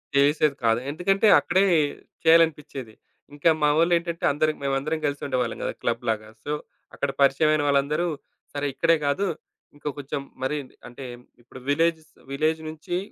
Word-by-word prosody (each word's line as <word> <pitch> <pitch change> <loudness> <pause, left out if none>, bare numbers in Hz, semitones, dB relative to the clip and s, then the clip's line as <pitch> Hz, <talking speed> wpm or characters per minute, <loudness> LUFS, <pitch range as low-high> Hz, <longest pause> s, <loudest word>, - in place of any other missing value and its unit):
చేసేది 145 +1 +3
కాదు. 115 0 +3
ఎందుకంటే, 195 +7 +2
అక్కడే 185 +3 +2 0.6
చేయాలనిపిచ్చేది. 155 -7 +2 0.4
ఇంకా 145 +3 +3
మా 150 - +5
వోళ్ళేంటంటే 170 0 +1
అందరం 155 +2 +1
మేమందరం 140 +3 -1
గలిసి 145 0 -2
ఉండేవాళ్ళం 125 -4 -1
గదా - - -2
క్లబ్ 115 0 -1
లాగా. 110 -1 -1 0.2
సో, 145 - -4 0.4
అక్కడ 140 - -1
పరిచయం 140 +3 +4
అయిన 155 -1 +1
వాళ్ళందరూ, 145 +4 +1 0.5
సరే, 145 0 -2
ఇక్కడే 165 +4 +3
కాదు. 190 +8 +1 0.5
ఇంకా 145 0 -5
కొంచెం 140 0 -4 0.2
మరి 135 +3 -1 0.3
అంటే 120 +2 -9 0.4
ఇప్పుడు 125 +2 -13
విలేజ్స్, 160 +2 +1 0.2
విలేజ్ 155 +3 +1
నుంచి 160 +3 -4
150 Hz, 140 wpm, -25 LUFS, 140-160 Hz, 0.6 s, మా